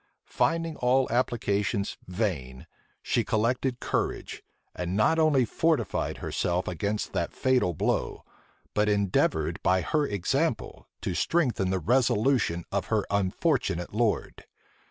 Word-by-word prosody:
Finding 165 -1 0
all 130 +1 +2
applications 105 -4 0
vain, 85 - -3 0.4
she 120 - +1
collected 125 +3 0
courage, - - -2 0.3
and 90 +2 -2
not 160 +10 +3
only 150 -5 +4
fortified 150 - 0
herself 90 +1 -1
against 100 +4 -2
the - - 0
fatal 125 -10 +1
blow, - - -1 0.5
but 105 0 +2
endeavored 100 -2 +1
by 95 0 +3
her 150 - 0
example 130 - -1
to - - -2
strengthen 125 - +1
the 95 - +1
resolution 110 - +2
of - - -1
her - - +1
unfortunate 100 - 0
lord. 110 -1 -1
110 Hz, 115 wpm, -27 LUFS, 95-130 Hz, 0.5 s, only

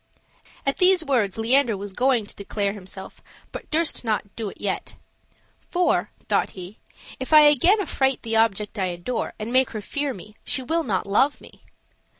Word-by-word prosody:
At 275 +4 0
these 365 -2 +5
words 230 -9 +1
Leander 235 0 +2
was 200 0 -6
going 250 -1 +2
to - - -11
declare 200 0 -2
himself, 190 -1 -9 0.3
but - - -8
durst 320 -2 0
not 210 -3 -2
do 220 -3 -4
it - - -14
yet. 200 -2 -3 0.7
"For," 355 0 +1 0.2
thought - - +1
he, 185 +3 -9 0.4
"if 260 - -5
I 305 -1 +9
again 300 - +5
affright 270 -8 0
the 225 -1 -2
object 215 -1 +1
I 190 - +1
adore 180 +7 -3
and 220 +3 -5
make 260 0 +4
her 215 - -5
fear 285 +7 -2
me, 210 -1 -10
she 265 - +1
will 325 +6 0
not 195 - -1
love 260 +9 +2
me." - - -16
230 Hz, 175 wpm, -24 LUFS, 205-280 Hz, 0.7 s, I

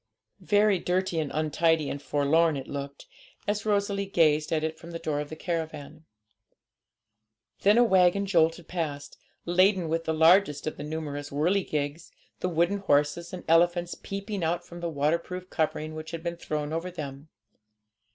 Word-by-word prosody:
Very 205 0 +3
dirty 180 -1 0
and 155 -3 -2
untidy 155 0 +1
and 140 - -4
forlorn 150 +2 +2
it 135 - -7
looked, 140 0 -6 0.4
as 205 +1 -1
Rosalie 200 -1 0
gazed 155 -5 +2
at 155 -1 +1
it 160 0 -3
from 170 - -11
the 170 - -5
door 155 -3 -2
of 150 0 -4
the 155 - -6
caravan. 160 -3 -5 1.5
Then 205 +3 +4
a 240 - +7
waggon 190 -2 +4
jolted 165 -2 +2
past, 150 -5 -4 0.3
laden 185 0 +3
with 165 +1 -1
the 160 - 0
largest 160 -1 +4
of 155 - -3
the 145 - -6
numerous 150 -2 -5
whirligigs, 155 -1 -1 0.3
the 180 - -1
wooden 175 +4 +1
horses 150 -1 +1
and 185 - -7
elephants 175 +1 +3
peeping 200 -1 -5
out 165 +2 -1
from 175 - -10
the 170 0 -3
waterproof 170 +5 -2
covering 155 -1 -1
which 155 0 -7
had 165 -1 -6
been 170 0 -3
thrown 150 -2 -3
over 165 +3 -2
them. 145 -3 -8
165 Hz, 160 wpm, -27 LUFS, 150-180 Hz, 1.5 s, a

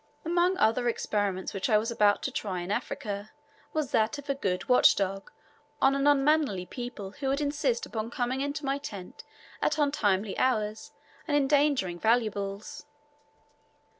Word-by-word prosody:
Among 350 +3 +2
other 240 -3 +2
experiments 205 -4 -2
which 195 +4 -2
I 215 - +5
was 225 +3 -1
about 210 -3 +3
to - - -2
try 185 -4 -3
in 175 +3 -5
Africa 205 0 -3 0.4
was 310 -4 -2
that 220 +6 +2
of 285 0 -4
a - - +2
good 190 -9 -2
watch 250 - +6
dog 195 0 -2 0.5
on 270 - +4
any 275 - 0
unmannerly 285 -9 +3
people 230 -2 -7
who 275 +6 -5
would 275 +1 +1
insist 285 -4 0
upon 220 0 -4
coming 250 +2 -2
into 285 +1 -3
my 275 +1 0
tent 205 -11 -8 0.4
at - - +1
untimely 215 -9 +1
hours 215 -4 0 0.4
and 290 -2 +2
endangering 280 -10 +2
valuables. 215 -2 -1
235 Hz, 155 wpm, -28 LUFS, 205-280 Hz, 0.5 s, watch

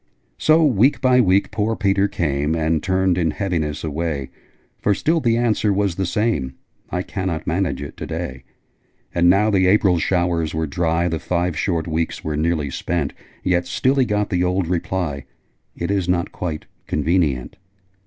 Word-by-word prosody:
So, 155 +1 +4
week 130 0 +3
by 130 -2 +4
week, 95 -2 +2
poor 110 +1 0
Peter 100 -2 +2
came 75 -5 -1
And 80 -1 +1
turned 95 -1 +1
in 85 -2 +1
heaviness 80 -5 -2
away; 75 -4 -3 0.5
For 105 - +2
still 165 - +1
the 115 -5 +2
answer 110 -3 +1
was 100 -2 +1
the 95 +1 -2
same, 90 - -1 0.3
'I 90 0 -2
cannot 95 -5 -3
manage 90 -3 -1
it 70 - -9
to - - -6
day.' 65 0 -5 0.7
And 85 0 +4
now 105 +4 +4
the 95 -2 +3
April 95 -3 +4
showers 85 -3 0
were 80 0 0
dry 85 +3 0
The 80 -2 -2
five 90 0 -1
short 85 0 -1
weeks 80 0 -2
were 75 -1 -2
nearly 80 -2 0
spent 80 -2 -2 0.3
Yet 90 -1 +1
still 130 - +1
he 135 -2 +3
got 105 -2 -1
the 90 -1 +1
old 90 0 +1
reply, 85 -4 -2 0.5
'It 85 +3 -3
is 95 -3 0
not 85 -1 0
quite 80 -4 -4 0.2
convenient!' 75 -5 0
90 Hz, 170 wpm, -21 LUFS, 80-100 Hz, 0.7 s, So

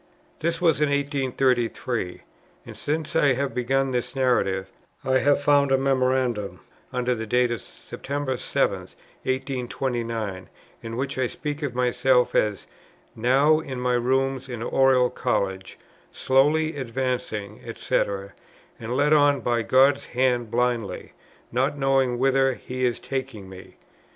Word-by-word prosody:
This 165 +1 -1
was 165 -3 +2
in 150 - +3
1833; 130 - -1 0.4
and, - - -10
since 155 +1 -3
I 145 -4 +4
have 135 +2 -2
begun 135 +2 0
this 125 +2 -3
narrative, 110 -8 +1 0.4
I 130 0 +3
have 145 +1 +2
found 140 -1 +4
a 135 - +5
memorandum 130 -5 0 0.3
under 125 0 0
the 110 -2 -5
date 125 +2 +2
of 120 - -3
September 140 -2 -5
7, - - 0
1829, 120 -6 -4 0.3
in 115 0 -6
which 135 0 -3
I 130 - +2
speak 150 +4 -5
of 140 -4 -3
myself, 125 0 +2
as 105 -2 0 0.5
"now 135 +7 +3
in 135 -5 -6
my 125 0 0
rooms 130 +2 0
in 120 -2 -5
Oriel 130 -1 +3
College, 100 -7 -2 0.3
slowly 150 +4 +2
advancing 115 -5 -3
&c. - - -3 0.8
and 120 +2 -3
led 150 +2 +3
on 145 -2 +4
by 120 0 0
God's 135 +4 +3
hand 125 -2 0
blindly, 120 -2 -1 0.4
not 130 +4 0
knowing 135 -3 +2
whither 135 0 +2
He 125 0 -2
is 120 - -2
taking 130 -7 -5
me." 95 -1 -12
130 Hz, 135 wpm, -24 LUFS, 120-135 Hz, 0.8 s, a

